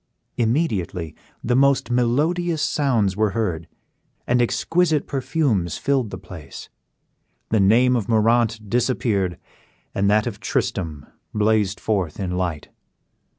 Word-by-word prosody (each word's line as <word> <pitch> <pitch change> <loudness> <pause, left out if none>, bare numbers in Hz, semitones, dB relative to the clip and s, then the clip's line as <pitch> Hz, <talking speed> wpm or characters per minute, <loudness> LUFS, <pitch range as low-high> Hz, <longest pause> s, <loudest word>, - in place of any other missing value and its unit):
Immediately 110 - -1 0.3
the 120 - +1
most 140 -1 +3
melodious 150 +7 +1
sounds 115 -10 +1
were 110 +1 +2
heard, 85 -8 -2 0.6
and 125 0 +2
exquisite 160 +5 +1
perfumes 125 - -1
filled 135 -5 0
the 95 - -6
place; 90 -6 -10 0.8
the 110 - +2
name 120 +6 +4
of 115 -3 -2
Moraunt 115 -1 +2
disappeared, 110 -6 0 0.6
and 100 0 +1
that 105 +1 +3
of 110 -4 -5
Tristram 80 -6 -2 0.3
blazed 105 -2 +1
forth 95 -7 -1
in 95 -3 -2
light. 90 -4 -3
110 Hz, 115 wpm, -22 LUFS, 95-125 Hz, 0.8 s, name